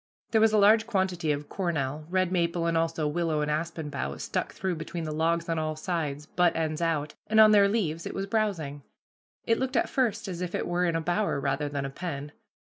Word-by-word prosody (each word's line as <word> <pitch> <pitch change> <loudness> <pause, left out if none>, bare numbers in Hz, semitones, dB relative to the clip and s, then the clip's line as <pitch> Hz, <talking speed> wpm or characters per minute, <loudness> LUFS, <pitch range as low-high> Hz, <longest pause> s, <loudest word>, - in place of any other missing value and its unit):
There 220 - +4
was 220 0 +5
a 215 - +3
large 215 +2 +5
quantity 185 -5 0
of 145 0 -3
cornel, 155 -5 -2
red 185 0 +1
maple, 170 -1 0
and 165 0 +1
also 165 -1 0
willow 155 0 0
and 150 0 0
aspen 160 -1 -3
boughs, 75 - -4
stuck - - -2
through 190 -1 -2
between 165 +1 -5
the 155 - -3
logs 165 +2 0
on 165 -1 0
all 155 0 -2
sides, 155 -3 -3
butt 175 +2 +2
ends 155 0 -1
out, 155 -3 0
and 220 0 +3
on 215 -1 +9
their 200 -1 +6
leaves 165 -7 -1
it - - -6
was 195 - -2
browsing. 195 -10 -1 0.6
It 230 - +2
looked 260 0 -1
at - - +1
first 245 -5 0
as 180 -2 -5
if 180 -1 -3
it - - -1
were 175 +1 +1
in 170 -2 0
a 165 - 0
bower 175 -1 0
rather 140 +1 -1
than 140 -1 -3
a 135 - -4
pen. 145 -2 -5
165 Hz, 225 wpm, -28 LUFS, 150-190 Hz, 0.6 s, on